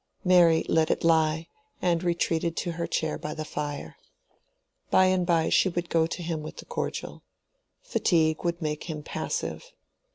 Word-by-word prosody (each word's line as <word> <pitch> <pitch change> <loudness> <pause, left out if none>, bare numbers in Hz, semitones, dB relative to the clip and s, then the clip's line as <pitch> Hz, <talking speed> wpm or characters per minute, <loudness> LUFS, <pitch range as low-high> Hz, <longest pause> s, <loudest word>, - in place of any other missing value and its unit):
Mary 175 -3 +5
let 160 -1 +2
it - - 0
lie, 160 0 +2 0.3
and 170 -2 +1
retreated 170 -1 0
to 175 - -1
her 170 0 -3
chair 160 -1 -1
by 150 +1 -5
the 155 -1 -4
fire. 145 -1 -5 0.9
By 185 - +5
and 185 -1 +2
by 165 -2 +2
she 190 - +4
would 175 -1 -4
go 160 -1 +3
to 175 +1 -5
him 165 -2 -3
with 155 - -8
the - - -9
cordial. - - -4 0.6
Fatigue 160 - +1
would 170 -1 -1
make 150 -1 -3
him 155 -3 -5
passive. - - -4
165 Hz, 165 wpm, -27 LUFS, 155-175 Hz, 0.9 s, Mary